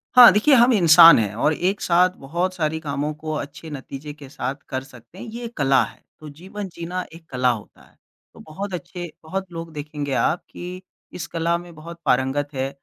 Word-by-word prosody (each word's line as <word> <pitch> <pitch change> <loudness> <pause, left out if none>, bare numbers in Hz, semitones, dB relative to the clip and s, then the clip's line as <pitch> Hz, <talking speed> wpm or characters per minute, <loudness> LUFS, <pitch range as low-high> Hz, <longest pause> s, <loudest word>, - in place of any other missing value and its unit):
हाँ, 245 -5 +11
देखिए 215 +8 +4
हम 240 +1 +5
इंसान 170 - +8
हैं 105 -2 -1
और 150 +6 +2
एक 185 +6 -1
साथ 180 +1 +4
बहुत 175 +6 -1
सारी 160 -1 -1
कामों 145 0 -3
को 155 0 -4
अच्छे 145 +2 -7
नतीज़े 140 +1 -8
के 145 -2 -13
साथ 135 -1 -4
कर 130 0 -3
सकते 125 +5 -17
हैं - - -8
ये 235 +1 -8
एक 230 - -9
कला 135 -2 +4
है, - - -11 0.2
तो 155 -1 -10
जीवन 190 +7 -8
जीना 175 +2 -4
एक 165 0 -14
कला 125 -1 +1
होता 110 -4 -5
है, - - -28 0.4
तो - - -16
बहुत 190 +5 -7
अच्छे 175 +1 -6
बहुत 190 +3 -5
लोग 165 -1 -7
देखेंगे 145 -1 -5
आप 130 +7 +1
की 180 +1 -8 0.3
इस 165 - -5
कला 170 +1 0
में 175 -1 -11
बहुत 170 +2 -10
पारंगत 135 +3 +1
है, 135 0 -2
160 Hz, 205 wpm, -22 LUFS, 140-180 Hz, 0.4 s, हाँ